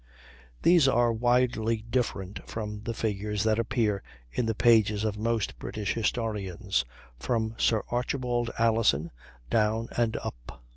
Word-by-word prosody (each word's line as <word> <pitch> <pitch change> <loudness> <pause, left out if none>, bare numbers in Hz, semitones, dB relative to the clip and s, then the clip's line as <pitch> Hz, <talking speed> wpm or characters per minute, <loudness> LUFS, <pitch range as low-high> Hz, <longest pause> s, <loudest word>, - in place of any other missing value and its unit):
These 170 -5 +6
are 120 -3 +3
widely 115 -2 +1
different 105 -6 -2
from 105 -2 -5
the 115 - -2
figures 105 -1 -1
that 110 0 +2
appear 110 -4 0 0.3
in 120 - -1
the 115 - 0
pages 110 -2 +4
of 110 -2 0
most 115 0 -1
British 105 -2 -3
historians, 105 - -1 0.3
from 110 - -1
Sir 110 -2 +2
Archibald 120 -1 -1
Alison 110 -9 +2 0.4
down 110 +1 +1
and 115 -2 +1
up. - - -8
110 Hz, 130 wpm, -28 LUFS, 105-115 Hz, 0.4 s, These